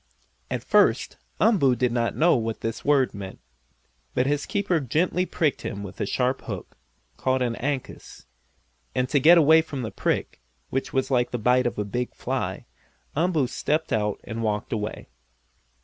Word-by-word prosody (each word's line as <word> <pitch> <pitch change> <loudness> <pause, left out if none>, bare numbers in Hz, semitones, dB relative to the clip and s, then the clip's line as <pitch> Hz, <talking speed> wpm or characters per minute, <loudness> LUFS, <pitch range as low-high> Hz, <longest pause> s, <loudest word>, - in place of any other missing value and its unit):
At - - -3
first - - +3 0.2
Umboo 180 - +4
did 125 0 +1
not 120 -1 0
know 170 +3 +5
what 115 -2 -2
this 115 0 -4
word 140 -3 +3
meant. 100 -2 -8 0.8
But 125 - +2
his 145 +1 0
keeper 200 -5 +1
gently 170 +7 0
pricked 155 -4 0
him 100 0 -5
with 100 - -8
a - - 0
sharp 125 +4 0
hook, - - -6 0.4
called 130 0 +1
an 120 -2 -1
"ankus," 135 - -5 0.7
and 125 - +1
to 145 - +3
get 165 +6 +7
away 160 0 +6
from 145 -5 -6
the 110 - -4
prick, - - -2 0.3
which 135 +2 -2
was 135 -2 0
like 125 -2 +2
the 125 - -2
bite 125 +2 +3
of - - -4
a 105 - -1
big 120 +5 -3
fly, - - -3 0.5
Umboo 160 -2 +2
stepped 155 +5 -1
out 105 -1 0
and 115 0 -5
walked 105 0 -1
away. 105 -1 -4
130 Hz, 170 wpm, -25 LUFS, 115-150 Hz, 0.8 s, get